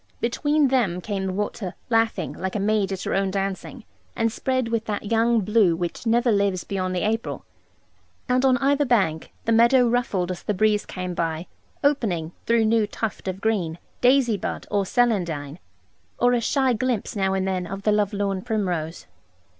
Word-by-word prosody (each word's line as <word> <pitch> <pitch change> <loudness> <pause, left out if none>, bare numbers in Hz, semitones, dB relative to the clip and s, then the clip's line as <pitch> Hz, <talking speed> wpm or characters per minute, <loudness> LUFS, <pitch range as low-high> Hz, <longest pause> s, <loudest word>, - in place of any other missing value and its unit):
Between 290 +4 +1
them 225 -9 +1
came 195 0 -3
the - - -1
water 200 -1 -3 0.2
laughing, 225 0 +1
like 190 +2 -4
a - - 0
maid 205 -1 +1
at 190 -1 -4
her - - -2
own 195 0 +1
dancing, 195 +5 -4 0.3
and 225 0 +1
spread 255 0 -1
with 230 -1 -1
that 210 -1 -4
young 230 0 +3
blue 205 -4 +3
which 175 +6 -4
never 235 +1 +3
lives 200 -3 +1
beyond 185 -2 -2
the 180 - -1
April. 225 +1 -3 0.8
And 250 0 +2
on 260 -1 +4
either 280 +2 +2
bank, 195 - +1
the 230 - +1
meadow 235 +2 +5
ruffled 220 -7 0
as 180 - -6
the 210 - -2
breeze 210 +1 +2
came 180 -1 -4
by, 165 0 -2 0.4
opening 200 - +1 0.2
(through 230 -1 +3
new 220 -1 +2
tuft, 215 -1 -4
of 190 +1 -4
green) 190 -7 0 0.2
daisy 245 -3 +4
bud - - -4
or 200 -2 +1
celandine, 170 - 0 0.6
or 245 0 +3
a 240 - +2
shy 265 +1 +2
glimpse 240 -2 -1
now 195 -1 +1
and 190 0 -1
then 185 -2 -2
of 195 +2 -6
the 210 - +3
love 210 -1 +2
lorn 200 -2 -1
primrose. 180 -7 -2
210 Hz, 180 wpm, -24 LUFS, 185-235 Hz, 0.8 s, meadow